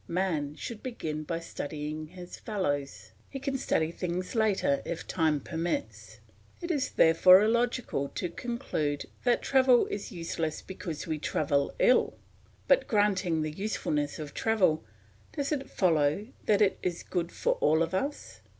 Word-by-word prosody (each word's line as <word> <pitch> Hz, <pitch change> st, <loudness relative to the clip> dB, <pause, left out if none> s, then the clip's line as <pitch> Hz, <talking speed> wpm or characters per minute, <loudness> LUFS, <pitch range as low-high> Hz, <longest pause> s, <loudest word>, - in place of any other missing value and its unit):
Man 165 Hz, -5 st, -1 dB
should 225 Hz, +5 st, -7 dB
begin 160 Hz, -12 st, -4 dB
by 165 Hz, +1 st, -2 dB
studying 155 Hz, -1 st, -5 dB
his 180 Hz, +1 st, -10 dB
fellows; 145 Hz, -10 st, -3 dB, 0.2 s
he 275 Hz, -, -6 dB
can 275 Hz, 0 st, -3 dB
study 160 Hz, -7 st, +1 dB
things 180 Hz, +1 st, -3 dB
later 210 Hz, -, +2 dB
if 170 Hz, -, -5 dB
time 160 Hz, -4 st, +1 dB
permits. 170 Hz, -, -4 dB, 0.4 s
It 345 Hz, 0 st, -3 dB
is 290 Hz, -5 st, 0 dB
therefore 180 Hz, +4 st, +7 dB
illogical 235 Hz, -, 0 dB
to 180 Hz, -, -2 dB
conclude 170 Hz, -, -3 dB, 0.2 s
that 245 Hz, -1 st, +3 dB
travel 260 Hz, -3 st, +5 dB
is 205 Hz, -, -5 dB
useless 165 Hz, -2 st, -3 dB
because 170 Hz, -5 st, -6 dB
we 155 Hz, -2 st, -2 dB
travel 145 Hz, -1 st, 0 dB
ill. -, -, +3 dB, 0.5 s
But -, -, +4 dB
granting 190 Hz, -6 st, +2 dB
the 155 Hz, -, -2 dB
usefulness 150 Hz, -5 st, -2 dB
of 150 Hz, -2 st, -7 dB
travel, 190 Hz, -, +2 dB, 0.5 s
does 285 Hz, -1 st, -2 dB
it 275 Hz, -3 st, -2 dB
follow 165 Hz, +3 st, +1 dB, 0.2 s
that 210 Hz, 0 st, +5 dB
it 195 Hz, -, +1 dB
is 175 Hz, -2 st, -2 dB
good 175 Hz, -2 st, -2 dB
for -, -, +1 dB
all 160 Hz, +2 st, +4 dB
of 165 Hz, -, -4 dB
us? 280 Hz, +10 st, -3 dB
180 Hz, 150 wpm, -29 LUFS, 155-225 Hz, 0.5 s, therefore